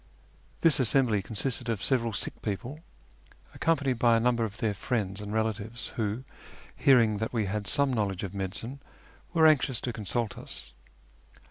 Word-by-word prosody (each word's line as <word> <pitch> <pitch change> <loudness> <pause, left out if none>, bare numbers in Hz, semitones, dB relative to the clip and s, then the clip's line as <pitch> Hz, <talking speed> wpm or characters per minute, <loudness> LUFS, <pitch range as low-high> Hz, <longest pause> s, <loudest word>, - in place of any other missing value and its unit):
This 165 -4 +4
assembly 125 -4 +3
consisted 120 +4 -3
of 110 -3 -1
several 120 -4 +1
sick 105 - -4
people, 120 +8 -4 0.7
accompanied 140 -7 +1
by 115 -1 +5
a - - +2
number 120 0 +2
of 105 -2 -4
their 110 -2 0
friends 100 -2 -2
and 105 0 -6
relatives, 110 +1 -2
who, 110 +2 -2 0.5
hearing 115 -6 +5
that 110 +3 -3
we 110 -3 +1
had 100 +1 -3
some 140 -2 +2
knowledge 100 -5 -1
of 95 -1 -4
medi 95 -1 -3
cine, 130 +5 -6 0.5
were 165 -2 +4
anxious 140 -5 +4
to 120 - -3
consult 110 +1 -2
us. 65 - -9
115 Hz, 160 wpm, -29 LUFS, 105-125 Hz, 0.7 s, by